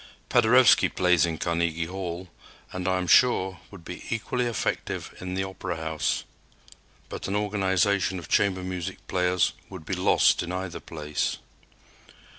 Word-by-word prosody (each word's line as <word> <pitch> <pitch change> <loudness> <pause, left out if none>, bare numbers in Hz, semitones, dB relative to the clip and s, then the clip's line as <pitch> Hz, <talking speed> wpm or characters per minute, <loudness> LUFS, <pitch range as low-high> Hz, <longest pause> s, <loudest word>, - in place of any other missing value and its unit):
Paderewski 125 +1 +5
plays 90 -2 +3
in 80 -1 -3
Carnegie 85 -1 -1
Hall, 90 0 -5 0.5
and, 90 -1 -3
I 95 0 +2
am 90 - -2
sure, 95 -2 +4
would 90 -5 -13
be 90 - -8
equally 120 +2 -1
effective 115 - -3
in 90 0 -5
the 95 - 0
Opera 95 -2 -5
House. 80 -3 -1 0.8
But - - -6
an 100 - -2
organization 100 -2 +1
of 85 - -8
chamber 95 -2 +2
music 90 -2 -5
players 90 -1 +1 0.2
would 95 -5 -9
be 95 - -3
lost 90 0 +3
in 85 - -4
either 90 -1 -4
place. 75 -2 -3
90 Hz, 145 wpm, -26 LUFS, 85-95 Hz, 0.8 s, Paderewski